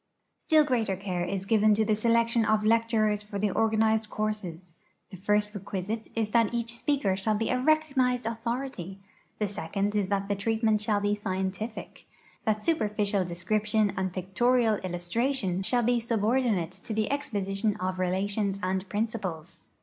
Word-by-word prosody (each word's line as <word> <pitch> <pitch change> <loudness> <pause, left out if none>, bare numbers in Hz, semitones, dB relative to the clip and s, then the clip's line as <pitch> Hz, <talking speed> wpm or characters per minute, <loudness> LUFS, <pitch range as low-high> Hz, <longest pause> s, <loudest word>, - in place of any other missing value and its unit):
Still 310 -2 +4
greater 235 -8 0
care 185 -2 -3
is 190 +2 -3
given 215 0 +4
to 220 +1 +2
the 215 0 +2
selection 230 +1 +2
of 215 -1 +2
lecturers 220 -2 +2
for 210 0 -6
the 205 0 0
organized 220 0 +2
courses. 190 -6 -4 0.4
The 190 - -8
first 210 +2 +1
requisite 205 +2 -4
is 220 -2 0
that 230 0 +2
each 235 0 -2
speaker 235 -7 0
shall 210 +3 0
be 225 +2 -1
a 255 - +1
recognized 270 -4 +2
authority; 230 -4 -4 0.4
the 210 - 0
second 200 +2 -2
is 205 -2 +1
that 200 0 -1
the 205 - +1
treatment 220 +1 +1
shall 210 -1 +1
be 205 0 +1
scientific 195 +2 -4 0.2
— - - -30
tliat 215 -1 +1
superficial 210 - +1
description 210 +4 0
and 190 0 -1
pictorial 220 +5 +1
illus 175 -1 -4
tration 225 -4 0
shall 245 +4 +1
be 240 +1 +2
subordinate 225 -5 +1
to 195 +4 -7
the 215 +2 0
exposition 210 -7 -1
of 185 0 -3
relations 195 +2 0
and 190 +1 -1
principles. 205 -7 -3
210 Hz, 160 wpm, -28 LUFS, 195-230 Hz, 0.4 s, Still